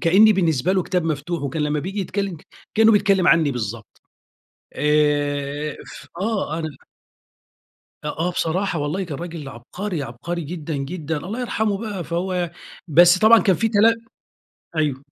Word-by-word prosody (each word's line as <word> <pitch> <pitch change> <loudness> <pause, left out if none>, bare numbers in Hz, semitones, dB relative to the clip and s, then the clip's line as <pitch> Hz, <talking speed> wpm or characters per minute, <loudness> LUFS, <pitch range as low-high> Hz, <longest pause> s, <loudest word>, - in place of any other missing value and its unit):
كأني 195 +6 +6
بالنسبة 170 -4 +1
له 190 -1 +2
كتاب 180 -1 -1
مفتوح، 160 +1 -2
وكان 150 +2 -2
لما 150 0 0
بييجي 195 +6 -4
يتكلّم 195 -1 -3 0.4
كأنه 220 0 +6
بيتكلّم 200 -3 +3
عني 160 -3 +4
بالضبط. 115 -3 -6 0.7
آآ، 145 0 +1
ف - - -11
آه، 195 -7 -1
أنا 160 -1 -3 1.4
أ - - -2
آه 165 +4 -1
بصراحة، 175 +1 -1
والله 150 +7 -2
كان 150 -6 -6
راجل 165 -4 -6
عبقري، 155 - -5
عبقري 155 +8 -5
جدًا، 160 -1 -5
جدًا، 155 +3 -3
الله 200 +11 -5
يرحمه 220 -4 -1
بقى 205 -5 -5
فهو 175 +1 -2 0.4
بس 175 +4 +6
طبعًا 220 +2 +7
كان 190 -4 +3
في 225 - +1
تلا 220 +1 +5 0.8
أيوه. 145 -3 -1
170 Hz, 145 wpm, -22 LUFS, 150-195 Hz, 1.4 s, طبعًا